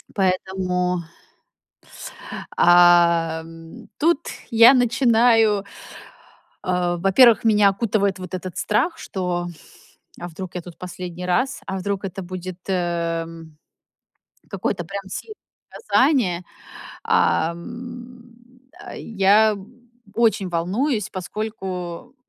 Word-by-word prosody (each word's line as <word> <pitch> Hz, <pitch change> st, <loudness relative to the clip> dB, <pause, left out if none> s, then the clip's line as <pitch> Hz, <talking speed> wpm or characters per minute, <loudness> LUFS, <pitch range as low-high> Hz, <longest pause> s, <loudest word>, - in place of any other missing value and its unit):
поэтому 185 Hz, -1 st, 0 dB, 1.3 s
с -, -, -5 dB, 0.2 s
а, 170 Hz, -2 st, +5 dB
м, 165 Hz, 0 st, -13 dB
тут 330 Hz, -1 st, +3 dB, 0.3 s
я 230 Hz, +3 st, +8 dB
начинаю 230 Hz, -4 st, +3 dB, 1.0 s
а, 180 Hz, -1 st, 0 dB
во-первых, 210 Hz, +6 st, +5 dB
меня 210 Hz, -2 st, +5 dB
окутывает 200 Hz, -2 st, 0 dB
вот 185 Hz, -1 st, -9 dB
этот 185 Hz, -1 st, -6 dB
страх, 255 Hz, +11 st, 0 dB
что, 180 Hz, -, -3 dB, 0.7 s
а 175 Hz, -, -6 dB
вдруг 180 Hz, +2 st, -8 dB
я 180 Hz, -, -3 dB
тут 170 Hz, 0 st, -13 dB
последний 180 Hz, 0 st, -7 dB
раз, 255 Hz, +9 st, 0 dB
а 190 Hz, -, -4 dB
вдруг 200 Hz, +1 st, -3 dB
это 190 Hz, 0 st, -6 dB
будет, 185 Hz, 0 st, -7 dB
эм, 165 Hz, -3 st, -3 dB, 0.9 s
какое-то 180 Hz, -3 st, -3 dB
прямо 195 Hz, +1 st, -7 dB
сильное 430 Hz, -, -7 dB, 0.4 s
наказание. 250 Hz, -, +1 dB, 0.6 s
Ам, 240 Hz, +8 st, -2 dB, 0.6 s
а, -, -, -9 dB
я 210 Hz, +1 st, +3 dB, 0.6 s
очень 220 Hz, -5 st, +2 dB
волнуюсь, 205 Hz, -, -1 dB
поскольку, 190 Hz, +2 st, -6 dB
190 Hz, 95 wpm, -22 LUFS, 175-225 Hz, 1.3 s, я